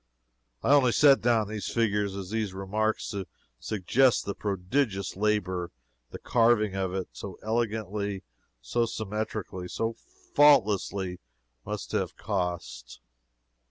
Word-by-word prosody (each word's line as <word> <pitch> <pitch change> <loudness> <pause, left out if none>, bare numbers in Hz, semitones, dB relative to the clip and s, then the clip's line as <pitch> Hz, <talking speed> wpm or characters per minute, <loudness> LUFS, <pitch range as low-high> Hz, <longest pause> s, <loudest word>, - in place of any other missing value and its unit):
I 140 - +4
only 130 -5 +5
set 140 -2 +6
down 115 -3 +2
these 105 0 -4
figures 105 -4 0
and 95 -2 -5
these 105 -2 -2
remarks 110 +3 -1
to 100 -3 -4 0.3
suggest 115 +5 +2
the 100 - -2
prodigious 100 +2 -1
labor 95 -4 0 0.4
the - - -7
carving 115 -4 +3
of 95 -1 -1
it 95 -1 -3
so 95 -3 -8
elegantly, 105 -3 -2 0.4
so 115 - 0
symmetrically, 105 -4 -4
so 115 +5 -2 0.4
faultlessly, 100 -10 +4 0.5
must - - -5
have - - -2
cost. 90 - -4
105 Hz, 120 wpm, -28 LUFS, 95-115 Hz, 0.5 s, set